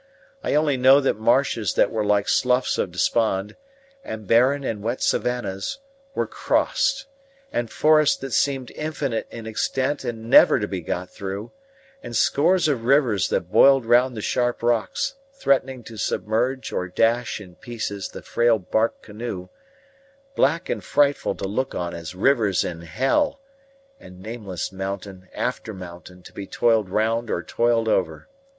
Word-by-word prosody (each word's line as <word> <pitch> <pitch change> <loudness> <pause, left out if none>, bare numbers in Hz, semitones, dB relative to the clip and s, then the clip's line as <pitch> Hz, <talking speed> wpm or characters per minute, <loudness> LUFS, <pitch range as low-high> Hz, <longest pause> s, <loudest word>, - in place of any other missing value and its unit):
I - - 0
only 150 -3 +2
know 130 +2 +6
that 135 -6 0
marshes 115 -2 +1
that - - +3
were 110 -1 -1
like 105 -1 +1
Sloughs 125 0 +2
of 90 - -1
Despond, 100 +2 0 0.5
and 110 -1 -7
barren 130 +7 +3
and 110 -5 -3
wet 115 +4 -2
savannahs, 125 - -1 0.4
were - - 0
crossed; 270 0 0 0.5
and 120 -1 -1
forests 155 +2 +3
that 135 -2 -7
seemed 135 -3 0
infinite 145 -6 -3
in 115 - -9
extent 130 +5 -1
and 115 -2 -5
never 120 - +7
to 105 - -2
be 95 -3 -4
got 90 +3 -4
through; 100 +2 -6 0.5
and 120 - -7
scores 170 +8 +3
of 135 -6 -1
rivers 125 -7 +3
that - - -2
boiled 135 -3 +6
round 120 +1 +3
the 105 - -5
sharp 120 -1 -1
rocks, 120 - 0 0.2
threatening 135 - 0
to 110 0 -11
submerge 120 +6 -1
or 90 - -2
dash 115 +7 +1
in 95 -4 -12
pieces 105 -2 -5
the - - -10
frail 120 -1 +2
bark 110 +4 -1
canoe 105 -4 -6 0.9
black 165 +6 +1
and - - -3
frightful 145 0 +1
to - - -4
look 130 +7 -2
on 85 0 -3
as 85 +1 -7
rivers 110 -2 +2
in 85 -1 -5
hell; 135 - 0 0.6
and 90 0 -14
nameless 100 -4 -5
mountain 95 -1 -6
after 115 -3 -3
mountain 90 0 -11
to - - -14
be 100 - -7
toiled 110 -4 +2
round 115 +3 0
or 85 - -2
toiled 115 -1 +1
over. 90 -7 0
115 Hz, 155 wpm, -23 LUFS, 100-130 Hz, 0.9 s, never